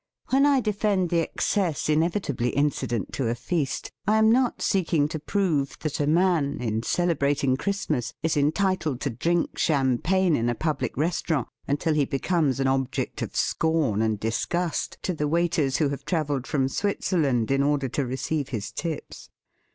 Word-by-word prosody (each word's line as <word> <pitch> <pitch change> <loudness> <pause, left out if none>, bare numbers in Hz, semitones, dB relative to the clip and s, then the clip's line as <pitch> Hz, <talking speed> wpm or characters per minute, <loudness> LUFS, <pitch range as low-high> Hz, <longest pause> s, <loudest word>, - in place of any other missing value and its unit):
When 275 +2 +5
I 275 -2 +4
defend 205 -4 0
the 170 - +3
excess 170 0 -1
inevitably 155 - +1
incident 125 -6 -1
to 130 - -1
a 115 - 0
feast, 140 +2 -2 0.2
I 215 +1 +4
am 220 0 +5
not 250 +1 +2
seeking 165 -6 +1
to 155 - -4
prove 155 -5 0
that 155 -2 -3
a 145 - +1
man 165 -3 +2
in 110 -2 -1
celebrating 140 -2 +1
Christ 200 +5 -2
mas 125 -4 -1
is 160 - +1
entitled 155 -1 +1
to 140 - -1
drink 170 +9 -1
champagne 155 +5 +2
in 115 -1 0
a 120 - 0
public 155 +4 -2
restaurant 155 -3 0 0.2
until 145 +3 0
he 150 -2 +2
becomes 140 -1 0
an 135 - +1
object 135 -1 -1
of - - -4
scorn 155 -10 +1
and 110 -2 0
disgust 165 - -2
to 185 - -1
the 150 -2 -1
wait 170 +2 +1
ers 135 -3 +1
who 150 -3 +2
have 140 - -5
travelled 145 -6 -1
from 135 -3 +1
Switzer 195 +3 -1
land 125 -6 +1
in 135 0 +3
order 140 -1 +1
to 140 - -1
receive 135 +3 -2
his 110 -6 -4
tips. 165 -3 -6
150 Hz, 175 wpm, -25 LUFS, 135-175 Hz, 0.2 s, When